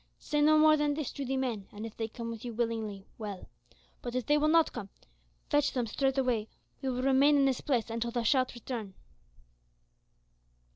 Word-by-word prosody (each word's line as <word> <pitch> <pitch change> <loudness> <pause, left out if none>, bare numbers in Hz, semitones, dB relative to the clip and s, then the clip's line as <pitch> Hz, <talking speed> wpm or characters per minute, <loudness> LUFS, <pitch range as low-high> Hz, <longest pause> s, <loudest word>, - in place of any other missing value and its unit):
Say 295 0 -1
no 310 +1 +6
more 310 0 +6
than 295 -1 +1
this 305 -3 -3
to 280 - -5
the 265 +1 -1
men, 235 -7 -2
and 210 +2 -7
if 225 - -8
they 225 - -2
come 230 +1 -6
with 225 -2 -8
you 240 -2 -6
willingly, 220 -4 -2
well, 205 -4 -6 0.5
but 240 0 -5
if 255 -3 -1
they 295 - +3
will 300 +1 +3
not 325 +1 +4
come, 200 - -6
then - - -28 0.4
fetch 290 -1 +3
them 250 -2 0
straightway. 255 -2 0 0.3
We 270 - -1
will 255 0 -2
remain 275 +2 +5
in 275 - +4
this 265 -2 +1
place 240 -5 0
until 230 +1 -2
thou 235 0 -2
shalt 255 +2 +2
return." 225 -5 -6
250 Hz, 200 wpm, -30 LUFS, 225-280 Hz, 0.5 s, no